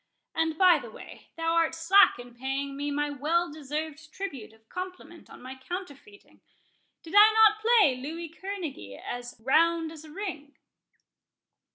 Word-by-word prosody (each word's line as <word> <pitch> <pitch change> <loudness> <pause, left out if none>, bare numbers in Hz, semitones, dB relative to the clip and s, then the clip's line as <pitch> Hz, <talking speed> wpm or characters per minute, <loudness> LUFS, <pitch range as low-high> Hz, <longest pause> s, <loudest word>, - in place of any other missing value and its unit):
And, 320 -1 -1
by 365 -1 +6
the - - -10
way, - - -13
thou 330 0 0
art 330 -1 +2
slack 345 +5 +5
in 245 0 -11
paying 270 +3 -4
me 290 +1 -3
my 290 0 -1
well 320 +4 0
deserved 310 +1 -6
tribute 285 - -7
of 220 0 -25
compliment 365 0 -8
on - - -13
my 260 +1 -7
counterfeiting.—Did 335 +3 -12
I 420 +1 +9
not 430 -1 +5
play 440 - +4
Louis 320 +6 -6
Kerneguy 330 - -7
as 245 -1 -7
round 325 +4 +2
as 320 -1 -11
a 310 - -13
ring?" 320 -6 -7
320 Hz, 150 wpm, -28 LUFS, 280-360 Hz, -, I